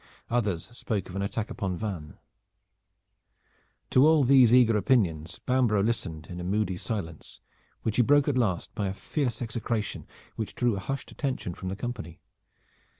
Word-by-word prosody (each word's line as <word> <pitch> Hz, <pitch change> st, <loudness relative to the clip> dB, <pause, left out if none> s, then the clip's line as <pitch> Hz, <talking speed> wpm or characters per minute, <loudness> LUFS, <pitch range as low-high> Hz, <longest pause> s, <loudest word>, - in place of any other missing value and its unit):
Others 105 Hz, -3 st, -1 dB
spoke 105 Hz, -6 st, -3 dB
of 90 Hz, -, -8 dB
an 100 Hz, -, -1 dB
attack 105 Hz, +2 st, -2 dB
upon 95 Hz, -3 st, -2 dB
Vannes. 90 Hz, -8 st, -5 dB, 1.8 s
To 130 Hz, +4 st, +6 dB
all 155 Hz, -2 st, +5 dB
these 130 Hz, -3 st, +6 dB
eager 120 Hz, -3 st, +6 dB
opinions 90 Hz, -8 st, +1 dB
Bambro' 120 Hz, -6 st, +3 dB
listened 85 Hz, -9 st, -2 dB
in 90 Hz, -, -7 dB
a -, -, -5 dB
moody 100 Hz, +1 st, 0 dB
silence, 90 Hz, -6 st, -5 dB, 0.4 s
which 110 Hz, -, -1 dB
he -, -, +6 dB
broke 145 Hz, +4 st, +4 dB
at 145 Hz, -, +1 dB
last 105 Hz, -9 st, 0 dB
by 100 Hz, -3 st, -1 dB
a 95 Hz, -, -3 dB
fierce 120 Hz, +3 st, -2 dB
execration 110 Hz, -2 st, -3 dB, 0.3 s
which 110 Hz, -, -4 dB
drew 120 Hz, -3 st, +1 dB
a -, -, -3 dB
hushed 135 Hz, +8 st, -4 dB
attention 130 Hz, -, -3 dB
from 95 Hz, +2 st, -6 dB
the 95 Hz, -, -3 dB
company. 105 Hz, -7 st, -6 dB
110 Hz, 160 wpm, -28 LUFS, 95-120 Hz, 1.8 s, To